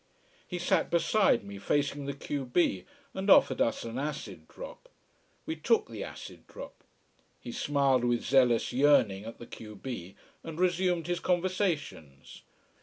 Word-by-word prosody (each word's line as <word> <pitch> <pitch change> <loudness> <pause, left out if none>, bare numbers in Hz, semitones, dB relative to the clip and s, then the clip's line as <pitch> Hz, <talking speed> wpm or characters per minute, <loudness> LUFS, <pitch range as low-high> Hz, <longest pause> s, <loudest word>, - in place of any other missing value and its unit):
He 180 - -4
sat 175 - +1
beside 170 - +3
me, 100 0 -9
facing 140 +5 -1
the 140 - -3
q 140 0 -4
b, 125 - +1 0.3
and 190 +1 -3
offered 130 -8 +6
us 115 - +1
an 115 +2 -5
acid 125 - -5
drop. - - -11 0.6
We 160 - -3
took 225 - +1
the 110 -3 -6
acid - - -10
drop. - - -11 0.6
He 120 - -8
smiled 135 -2 +1
with 120 -1 0
zealous 125 -3 +3
yearning 120 -8 +3
at 115 - -8
the 120 - -10
q 105 -2 -10
b, 95 -5 -7 0.3
and 165 0 -7
resumed 180 -2 +1
his 175 +1 -1
conversations. 170 - -2
140 Hz, 150 wpm, -30 LUFS, 115-170 Hz, 0.6 s, offered